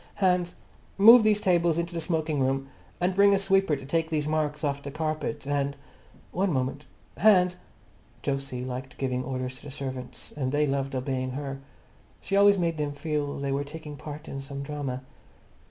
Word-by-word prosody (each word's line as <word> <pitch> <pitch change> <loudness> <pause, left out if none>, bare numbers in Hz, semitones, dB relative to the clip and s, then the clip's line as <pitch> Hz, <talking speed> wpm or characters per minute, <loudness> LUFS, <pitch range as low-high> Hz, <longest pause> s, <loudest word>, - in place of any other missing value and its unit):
"Hans, 180 -2 +1 0.4
move 225 +4 +9
these 215 -1 +4
tables 175 -4 +2
into 170 +1 -2
the 165 - -2
smoking 160 -3 -1
room, 135 +1 0 0.3
and 180 +1 +1
bring 200 +1 +6
a - - +3
sweeper 195 -4 +2
to 135 -1 -8
take 160 +3 0
these 155 -2 0
marks 155 0 -1
off 140 -1 -1
the 140 - -6
carpet 155 -1 -3
and—one 145 +6 -3
moment, 135 +1 -2 0.3
Hans—" 180 -4 +5 0.7
Jose 135 -3 -2
loved 130 +1 -6
giving 130 -1 -1
orders 130 0 -4
to - - -16
the - - -7
servants, 130 -2 -7
and 130 -3 -1
they 150 +1 +2
loved 135 -1 -1
obeying 130 0 -2
her. 135 0 -4 0.6
She 195 - -2
always 200 0 +6
made 170 -3 0
them 145 -1 -2
feel 145 -1 -2
they 140 0 -2
were 140 +1 0
taking 150 0 -8
part 150 +1 -8
in 135 - -5
some 140 0 -6
drama. 140 -3 -4
145 Hz, 175 wpm, -27 LUFS, 135-170 Hz, 0.7 s, move